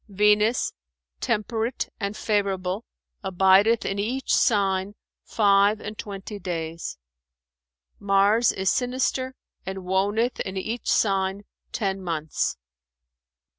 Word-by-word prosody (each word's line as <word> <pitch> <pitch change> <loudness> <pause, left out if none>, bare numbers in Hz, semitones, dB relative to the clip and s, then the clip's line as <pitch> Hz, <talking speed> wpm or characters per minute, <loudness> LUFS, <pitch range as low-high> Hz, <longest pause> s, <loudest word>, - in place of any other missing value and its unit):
Venus, 210 +3 +3 0.5
temperate 225 - -1
and 200 0 -3
favourable, 200 -1 -1 0.4
abideth 190 +4 +4
in 195 - -2
each 255 +6 -1
sign 195 -2 +2 0.3
five 205 0 +3
and 215 +1 -7
twenty 205 0 -7
days. 165 - -4 1.0
Mars 200 +4 +4
is 190 0 0
sinister 255 +1 -1 0.3
and 190 0 -6
woneth 205 +6 +1
in 190 0 -3
each 225 +5 -3
sign 195 -1 +1 0.3
ten 195 -3 -2
months. 160 -4 -2
200 Hz, 95 wpm, -25 LUFS, 190-220 Hz, 1.0 s, abideth